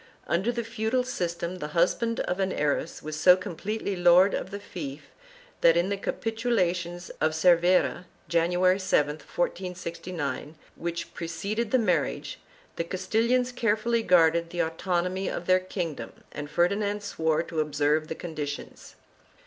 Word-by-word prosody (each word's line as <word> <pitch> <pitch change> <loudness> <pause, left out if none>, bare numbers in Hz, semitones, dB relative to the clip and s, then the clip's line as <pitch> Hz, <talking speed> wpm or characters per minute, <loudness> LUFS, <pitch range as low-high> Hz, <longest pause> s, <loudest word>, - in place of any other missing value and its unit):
Under 190 +8 +1
the 235 -1 -3
feudal 225 +2 -1
system, 175 -6 -3
the 150 - -4
husband 230 +7 +2
of 180 - -2
an 190 -1 +1
heiress 150 +1 -1
was 155 0 -5
so 180 +4 +6
completely 195 +3 -4
lord 180 +2 +6
of - - -3
the 200 - -6
fief 150 -7 -8 0.5
that, 165 0 +6
in 175 +3 +2
the 200 - 0
Capitulations 185 -6 -1
of 155 0 +2
Cervera, 175 +1 +3 0.2
January 180 +3 +3
7, 150 -5 +1
1469r 170 -4 -4 0.2
which 170 0 -4
preceded 200 +7 -3
the 260 - +4
marriage, 180 - 0 0.4
the - - 0
Castilians 225 +8 +1
carefully 230 -1 +1
guarded 170 -3 +4
the 175 0 -1
autonomy 180 +3 -1
of 175 - -4
their 185 0 +4
kingdom 180 -4 -4 0.2
and 145 0 -6
Ferdinand 200 +5 +1
swore 160 -4 0
to 165 -1 -4
observe 150 0 +1
the 160 - -4
conditions. 150 -4 -6
180 Hz, 140 wpm, -27 LUFS, 165-200 Hz, 0.5 s, so